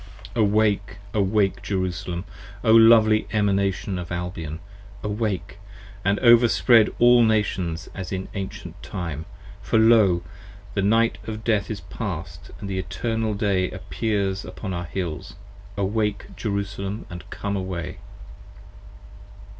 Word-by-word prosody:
p. -, -, -3 dB
97 -, -, +6 dB
AWAKE, 105 Hz, -1 st, +1 dB, 0.2 s
Awake, 100 Hz, -2 st, +1 dB
Jerusalem! 90 Hz, -2 st, -3 dB, 0.4 s
O 110 Hz, -, +4 dB
lovely 110 Hz, -1 st, +6 dB
Emanation 100 Hz, -2 st, 0 dB
of 90 Hz, 0 st, -7 dB
Albion, 85 Hz, -3 st, -4 dB, 0.5 s
Awake, 105 Hz, -2 st, -3 dB, 0.4 s
and 100 Hz, +2 st, +2 dB
overspread 120 Hz, -1 st, +6 dB
all 120 Hz, 0 st, +6 dB
Nations 95 Hz, -6 st, 0 dB
as 95 Hz, -2 st, -6 dB
in 95 Hz, 0 st, -3 dB
Ancient 100 Hz, -2 st, -6 dB
Time. 80 Hz, -4 st, -5 dB, 0.4 s
For -, -, +1 dB
lo! 110 Hz, -6 st, +5 dB, 0.5 s
the 100 Hz, -, 0 dB
Night 115 Hz, +3 st, +2 dB
of 110 Hz, 0 st, -5 dB
Death 110 Hz, -3 st, +1 dB
is 105 Hz, -4 st, -4 dB
past 85 Hz, -2 st, -6 dB
and 100 Hz, -, -6 dB
the 95 Hz, -1 st, -2 dB
Eternal 110 Hz, +2 st, -2 dB
Day 100 Hz, -3 st, +1 dB
Appears 100 Hz, 0 st, -2 dB
upon 95 Hz, -3 st, -6 dB
our 85 Hz, 0 st, -3 dB
Hills: 85 Hz, -3 st, -5 dB, 0.4 s
Awake, 105 Hz, +2 st, -1 dB
Jerusalem, 100 Hz, 0 st, -3 dB
and 85 Hz, -3 st, -9 dB
come 100 Hz, 0 st, -3 dB
away! 95 Hz, -3 st, -4 dB
100 Hz, 125 wpm, -24 LUFS, 90-110 Hz, 0.5 s, 97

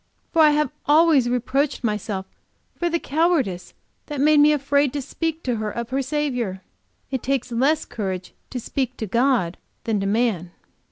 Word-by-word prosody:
For 330 Hz, -, +4 dB
I 305 Hz, -, +8 dB
have 300 Hz, 0 st, +1 dB, 0.2 s
always 300 Hz, -4 st, +5 dB
reproached 260 Hz, +4 st, 0 dB
myself 210 Hz, -3 st, -2 dB, 0.5 s
for 345 Hz, -, -1 dB
the 340 Hz, -, +1 dB
cowardice 295 Hz, -, 0 dB, 0.3 s
that 295 Hz, -3 st, -4 dB
made 300 Hz, +1 st, +5 dB
me 295 Hz, +1 st, +6 dB
afraid 285 Hz, -1 st, +2 dB
to 290 Hz, -, -2 dB
speak 320 Hz, +4 st, -3 dB
to 245 Hz, -3 st, -1 dB
her 215 Hz, 0 st, -2 dB
of 235 Hz, +2 st, -5 dB
her 270 Hz, +1 st, +1 dB
Saviour. 255 Hz, -8 st, -2 dB, 0.5 s
It 265 Hz, -3 st, -1 dB
takes 265 Hz, -2 st, -1 dB
less 275 Hz, +7 st, +2 dB
courage 190 Hz, -4 st, -5 dB, 0.2 s
to 255 Hz, -, -4 dB
speak 255 Hz, +1 st, -3 dB
to 220 Hz, -, -3 dB
God 235 Hz, -5 st, +1 dB, 0.2 s
than 220 Hz, -3 st, 0 dB
to 195 Hz, -, -1 dB
man." 200 Hz, -5 st, 0 dB
260 Hz, 170 wpm, -23 LUFS, 220-295 Hz, 0.5 s, I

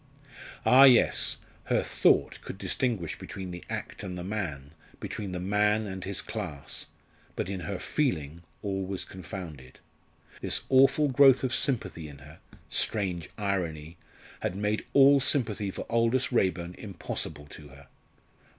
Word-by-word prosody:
Ah, 135 Hz, +2 st, +8 dB
yes! 125 Hz, -3 st, +4 dB, 0.3 s
her -, -, +1 dB
thought -, -, +2 dB
could -, -, -8 dB
distinguish 110 Hz, -11 st, -1 dB
between 95 Hz, -2 st, -7 dB
the 90 Hz, 0 st, -8 dB
act -, -, -5 dB
and 90 Hz, -1 st, -5 dB
the 90 Hz, -, -5 dB
man, 85 Hz, -9 st, -4 dB, 0.3 s
between 100 Hz, -3 st, -5 dB
the 90 Hz, -, -3 dB
man 105 Hz, +3 st, +2 dB
and 95 Hz, -2 st, -6 dB
his 100 Hz, 0 st, -3 dB
class; 70 Hz, -2 st, -6 dB, 0.5 s
but 95 Hz, -, -3 dB
in 95 Hz, -, -3 dB
her 100 Hz, +1 st, -4 dB
feeling 85 Hz, -, -1 dB, 0.2 s
all 95 Hz, -1 st, -2 dB
was 95 Hz, 0 st, -3 dB
confounded. 85 Hz, -8 st, -9 dB, 0.6 s
This -, -, -1 dB
awful 135 Hz, +3 st, +5 dB
growth 135 Hz, -1 st, +6 dB
of 130 Hz, -1 st, 0 dB
sympathy 100 Hz, -, -1 dB
in 70 Hz, -, -11 dB
her 75 Hz, +3 st, -14 dB, 0.3 s
strange 90 Hz, -6 st, 0 dB
irony! 85 Hz, -6 st, -2 dB, 0.4 s
had -, -, -2 dB
made 105 Hz, +2 st, -1 dB
all 140 Hz, 0 st, +7 dB
sympathy 115 Hz, -7 st, +1 dB
for -, -, -6 dB
Aldous 115 Hz, +3 st, +2 dB
Raeburn 90 Hz, -6 st, 0 dB
impossible 80 Hz, -6 st, -5 dB
to 75 Hz, -, -10 dB
her. 70 Hz, 0 st, -16 dB
95 Hz, 140 wpm, -28 LUFS, 85-115 Hz, 0.6 s, Ah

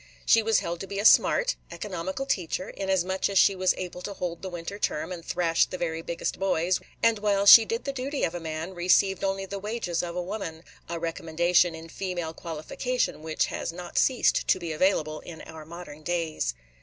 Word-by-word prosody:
She 225 Hz, -, +5 dB
was 225 Hz, -1 st, +2 dB
held 170 Hz, 0 st, -4 dB
to 195 Hz, -, -6 dB
be 200 Hz, -, -5 dB
a 205 Hz, -, -1 dB
"smart," -, -, +5 dB
economical 190 Hz, +5 st, -4 dB
teacher, 185 Hz, -6 st, -2 dB
inasmuch 190 Hz, -1 st, 0 dB
as 200 Hz, -, 0 dB
she 195 Hz, -, +6 dB
was 185 Hz, 0 st, +2 dB
able 180 Hz, -1 st, -6 dB
to 200 Hz, +2 st, -6 dB
hold 170 Hz, -2 st, -4 dB
the 190 Hz, -, -5 dB
winter 175 Hz, +3 st, -6 dB
term, 150 Hz, -1 st, -1 dB
and 175 Hz, -2 st, -6 dB
thrash 170 Hz, -1 st, +1 dB
the 185 Hz, -, -6 dB
very 165 Hz, -2 st, -2 dB
biggest 170 Hz, 0 st, -4 dB
boys, 185 Hz, -2 st, +1 dB, 0.2 s
and, 230 Hz, -2 st, +4 dB
while 200 Hz, -1 st, +1 dB
she 225 Hz, +2 st, +11 dB
did 230 Hz, +2 st, -3 dB
the 275 Hz, -, -3 dB
duty 270 Hz, +2 st, -3 dB
of 165 Hz, -, 0 dB
a 175 Hz, -, -4 dB
man, 160 Hz, +2 st, -5 dB
received 185 Hz, +2 st, +2 dB
only 195 Hz, 0 st, -1 dB
the 195 Hz, +1 st, -6 dB
wages 205 Hz, -4 st, -2 dB
of 170 Hz, -1 st, -5 dB
a 180 Hz, -, -2 dB
woman, 175 Hz, -4 st, -5 dB
– -, -, -26 dB
a 170 Hz, -, -3 dB
recommendation 170 Hz, +1 st, +1 dB
in 160 Hz, 0 st, -9 dB
female 175 Hz, -2 st, -4 dB
qualification 170 Hz, +8 st, -3 dB
which 160 Hz, 0 st, 0 dB
has -, -, -4 dB
not 175 Hz, +1 st, -9 dB
ceased 260 Hz, -2 st, +3 dB
to -, -, +4 dB
be 170 Hz, -3 st, -5 dB
available 155 Hz, -2 st, +1 dB
in 165 Hz, -2 st, -10 dB
our 160 Hz, -1 st, -10 dB
modern 165 Hz, -2 st, -10 dB
days. 160 Hz, -, -2 dB
180 Hz, 205 wpm, -27 LUFS, 165-195 Hz, 0.2 s, she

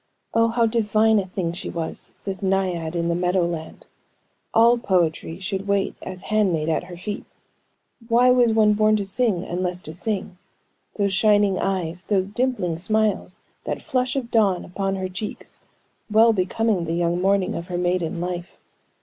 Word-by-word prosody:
Oh, 230 Hz, 0 st, +4 dB
how 230 Hz, 0 st, +2 dB
divine 220 Hz, -1 st, +3 dB
a 190 Hz, -, -3 dB
thing 180 Hz, -2 st, -2 dB
she 175 Hz, -, -5 dB
was, 165 Hz, -1 st, -5 dB, 0.2 s
this 195 Hz, -2 st, -3 dB
naiad 185 Hz, -4 st, 0 dB
in 170 Hz, 0 st, 0 dB
the 170 Hz, -, +1 dB
meadow 180 Hz, +1 st, +1 dB
land; 165 Hz, -2 st, -6 dB, 0.7 s
all 235 Hz, +1 st, +5 dB
poetry 170 Hz, -4 st, 0 dB
should 195 Hz, 0 st, -4 dB
wait 200 Hz, -1 st, +1 dB
as 185 Hz, -1 st, -7 dB
handmaid 185 Hz, -8 st, +1 dB
at 160 Hz, +2 st, 0 dB
her 175 Hz, -1 st, -10 dB
feet. 205 Hz, +3 st, -5 dB, 0.8 s
Why 245 Hz, +2 st, +5 dB
was 245 Hz, -2 st, +4 dB
one 215 Hz, -1 st, +4 dB
born 215 Hz, +1 st, +3 dB
to 205 Hz, -2 st, -1 dB
sing, 195 Hz, -2 st, 0 dB
unless 180 Hz, 0 st, -3 dB
to 155 Hz, -, -7 dB
sing. 190 Hz, 0 st, -3 dB, 0.6 s
Those 200 Hz, -2 st, 0 dB
shining 205 Hz, -1 st, +3 dB
eyes, 180 Hz, -2 st, -2 dB
those 190 Hz, -3 st, +1 dB
dimpling 210 Hz, -7 st, -1 dB
smiles, 215 Hz, -1 st, 0 dB, 0.3 s
that -, -, -4 dB
flush 255 Hz, -1 st, -1 dB
of 250 Hz, -4 st, -3 dB
dawn 200 Hz, -5 st, +2 dB
upon 195 Hz, +2 st, -2 dB
her 190 Hz, -1 st, -3 dB
cheeks, 190 Hz, +3 st, -7 dB, 0.5 s
well 225 Hz, +2 st, +5 dB
becoming 195 Hz, 0 st, 0 dB
the 165 Hz, +1 st, -2 dB
young 175 Hz, +1 st, 0 dB
morning 195 Hz, 0 st, +2 dB
of 170 Hz, +1 st, -5 dB
her 180 Hz, -, -3 dB
maiden 175 Hz, -1 st, -1 dB
life. 175 Hz, 0 st, -5 dB
195 Hz, 165 wpm, -23 LUFS, 175-215 Hz, 0.8 s, all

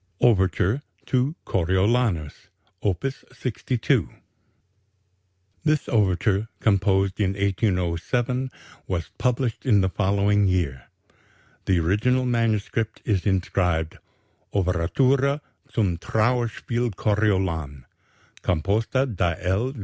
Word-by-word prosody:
OVERTURE 100 Hz, +1 st, +3 dB, 0.2 s
TO 130 Hz, +4 st, +1 dB
"CORIOLANUS": 95 Hz, -2 st, 0 dB, 0.3 s
Op. 95 Hz, -1 st, -1 dB, 0.3 s
62 125 Hz, -1 st, 0 dB, 1.5 s
This 155 Hz, -1 st, +1 dB
overture, 100 Hz, 0 st, +1 dB
composed 95 Hz, -2 st, +2 dB
in 95 Hz, -2 st, +1 dB
1807, 100 Hz, +6 st, 0 dB, 0.4 s
was 85 Hz, -3 st, -3 dB
published 125 Hz, -2 st, 0 dB
in 110 Hz, -7 st, +4 dB
the 95 Hz, -, +1 dB
following 100 Hz, +2 st, +2 dB
year. 80 Hz, -9 st, -1 dB, 0.8 s
The 95 Hz, -3 st, +3 dB
original 110 Hz, +10 st, +2 dB
manuscript 115 Hz, -2 st, 0 dB
is 100 Hz, -2 st, 0 dB
inscribed: 90 Hz, -4 st, 0 dB, 0.6 s
"_Overtura 130 Hz, -, +2 dB, 0.3 s
(Zum 95 Hz, -7 st, 0 dB
Trauerspiel 120 Hz, +3 st, 0 dB
Coriolan), 95 Hz, -11 st, 0 dB, 0.6 s
composta 105 Hz, -, +1 dB
da 90 Hz, -9 st, 0 dB
L. 95 Hz, +8 st, 0 dB
100 Hz, 85 wpm, -24 LUFS, 90-120 Hz, 1.5 s, in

